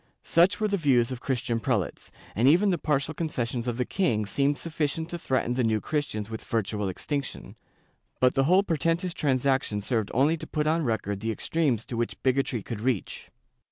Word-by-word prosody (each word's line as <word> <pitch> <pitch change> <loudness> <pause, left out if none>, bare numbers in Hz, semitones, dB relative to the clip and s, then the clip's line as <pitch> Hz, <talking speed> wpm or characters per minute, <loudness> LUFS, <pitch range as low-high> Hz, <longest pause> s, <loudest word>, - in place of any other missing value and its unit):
* - - -55
Such 180 +4 +3
were 215 - +2
the 200 -1 0
views 130 -7 +3
of 125 -1 -5
Christian 125 -3 -1
prelates, 110 -6 -2 0.3
and 115 +5 +3
even 185 +7 +5
the 175 - 0
partial 150 +1 0
concessions 125 -7 -2
of 120 -1 -1
the 125 - 0
king 120 - 0
seemed 140 +7 +1
sufficient 160 0 -2
to 175 - -4
threaten 130 -5 0
the 125 0 0
New 110 -1 +2
Chris 145 +5 -1
tians 105 -1 -5
with 110 0 -7
virtual 105 -2 -1
extinction, 140 +8 -4 0.6
but 125 0 +4
the 135 -1 +2
whole 185 +6 +5
portentous 165 +1 0
trans 135 -5 0
action 130 -6 +1
served 110 0 -1
only 145 +7 +3
to - - -8
put 150 -1 -1
on 160 +2 +2
record 110 -5 -1
the 110 +2 -3
extremes 125 -1 0
to 120 - -5
which 120 0 -2
bigotry 130 -4 +1
could 115 -3 -6
reach. 120 -4 -2
130 Hz, 200 wpm, -27 LUFS, 115-155 Hz, 0.6 s, even